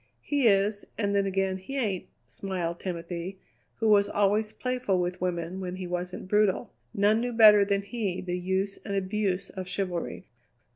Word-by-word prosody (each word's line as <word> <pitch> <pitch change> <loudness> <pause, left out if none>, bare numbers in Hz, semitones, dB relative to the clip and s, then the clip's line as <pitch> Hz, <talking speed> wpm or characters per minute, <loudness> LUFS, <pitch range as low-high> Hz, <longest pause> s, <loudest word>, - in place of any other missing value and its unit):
"He 285 -4 +2
is, 200 0 +3
and 200 -2 0
then 200 -1 +2
again 190 0 0
he 270 +9 -6
ain't," 205 -8 -1 0.2
smiled 175 -3 -4
Timothy, 175 +1 -5 0.4
who 225 - 0
was 205 -1 +5
always 210 +1 +2
playful 250 -7 -1
with 180 0 -2
women 175 0 -2
when 185 -1 -4
he 185 0 -5
wasn't 180 +1 -4
brutal. 210 -1 +2 0.2
None 210 +3 +3
knew 245 0 -2
better 210 -3 +8
than 200 0 0
he 200 -3 -3
the 180 -1 -3
use 190 +2 -1
and 200 - -3
abuse 195 0 -1
of 185 -2 -6
chivalry. 185 -1 -3
195 Hz, 165 wpm, -28 LUFS, 185-210 Hz, 0.4 s, better